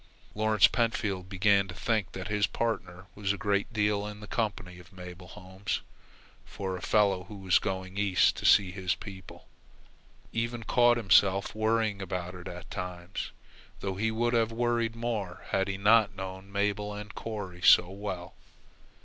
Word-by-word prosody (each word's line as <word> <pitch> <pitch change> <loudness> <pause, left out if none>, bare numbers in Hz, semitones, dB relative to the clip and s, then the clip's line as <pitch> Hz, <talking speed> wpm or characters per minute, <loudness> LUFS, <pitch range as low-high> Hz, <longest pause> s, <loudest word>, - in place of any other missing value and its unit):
Lawrence 110 -2 +4
Pentfield 100 -6 -1
began 100 +1 +3
to 85 - -8
think 110 -5 -1
that 95 0 -5
his 105 0 +1
partner 95 -6 -3
was 100 -2 -1
a 100 - -2
great 100 0 0
deal 105 -2 0
in 105 0 -8
the 105 - -9
company 95 -5 -3
of 90 +1 -16
Mabel 90 -1 -10
Holmes 95 +3 -5 0.6
for 95 -2 -5
a 90 - -7
fellow 100 -4 +2
who 105 - -10
was 95 -2 +3
going 95 +1 -4
east 100 -3 +3
to - - -5
see 95 -3 +6
his 90 -1 -1
people. 95 -3 -11 0.8
He - - -1
even 115 0 -3
caught 120 +1 +4
himself 100 -3 +4
worrying 110 -1 0
about 90 -1 -4
it 90 -1 -9
at 90 0 -9
times, 90 0 -5 0.5
though 95 -1 -3
he 110 +4 0
would 120 +2 0
have 115 -1 +2
worried 115 -1 0
more 110 -6 -4
had 95 0 +1
he 100 -1 -3
not 105 0 +4
known 95 0 -7
Mabel 105 +1 -1
and 105 0 -8
Corry 100 -5 -6
so 90 - +7
well. 95 -3 -6
100 Hz, 165 wpm, -29 LUFS, 95-110 Hz, 0.8 s, so